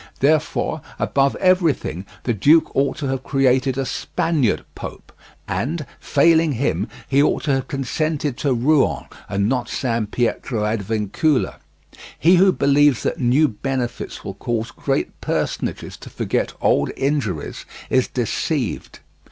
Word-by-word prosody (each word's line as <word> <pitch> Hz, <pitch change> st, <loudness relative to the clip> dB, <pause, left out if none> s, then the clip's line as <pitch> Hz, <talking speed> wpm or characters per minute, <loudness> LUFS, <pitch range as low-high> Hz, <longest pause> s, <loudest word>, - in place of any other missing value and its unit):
Therefore, 150 Hz, +2 st, +1 dB, 0.2 s
above 140 Hz, 0 st, +1 dB
everything, 165 Hz, -, +1 dB, 0.2 s
the 120 Hz, -, 0 dB
duke 150 Hz, -, +4 dB
ought 140 Hz, +3 st, +1 dB
to 155 Hz, -, -4 dB
have 135 Hz, -1 st, -2 dB
created 130 Hz, -1 st, +2 dB
a 135 Hz, -, 0 dB
Spaniard 145 Hz, -3 st, 0 dB
Pope, -, -, -9 dB, 0.3 s
and, 150 Hz, +4 st, -2 dB
failing 160 Hz, +1 st, +3 dB
him, 135 Hz, +4 st, -1 dB, 0.2 s
he 140 Hz, +1 st, +3 dB
ought 145 Hz, -, +1 dB
to 145 Hz, -, +1 dB
have 135 Hz, -1 st, -1 dB
consented 145 Hz, +1 st, -2 dB
to 140 Hz, -, 0 dB
Rouen 135 Hz, +4 st, +2 dB, 0.2 s
and 100 Hz, 0 st, 0 dB
not 125 Hz, 0 st, -1 dB
San 115 Hz, -4 st, -1 dB
Pietro 115 Hz, -1 st, -1 dB
ad 105 Hz, 0 st, 0 dB
Vincula. 110 Hz, +7 st, 0 dB, 0.6 s
He 175 Hz, +3 st, +5 dB
who 190 Hz, +2 st, +6 dB
believes 140 Hz, -4 st, +3 dB
that -, -, -1 dB
new 130 Hz, +5 st, +4 dB
benefits 125 Hz, +1 st, -4 dB
will 95 Hz, -, -4 dB
cause 115 Hz, +2 st, -3 dB
great -, -, -2 dB
personages -, -, -3 dB
to -, -, -11 dB
forget -, -, -2 dB
old -, -, +2 dB
injuries 135 Hz, -, -2 dB, 0.3 s
is 130 Hz, -1 st, +3 dB
deceived. 125 Hz, +2 st, -2 dB
135 Hz, 135 wpm, -21 LUFS, 120-150 Hz, 0.6 s, who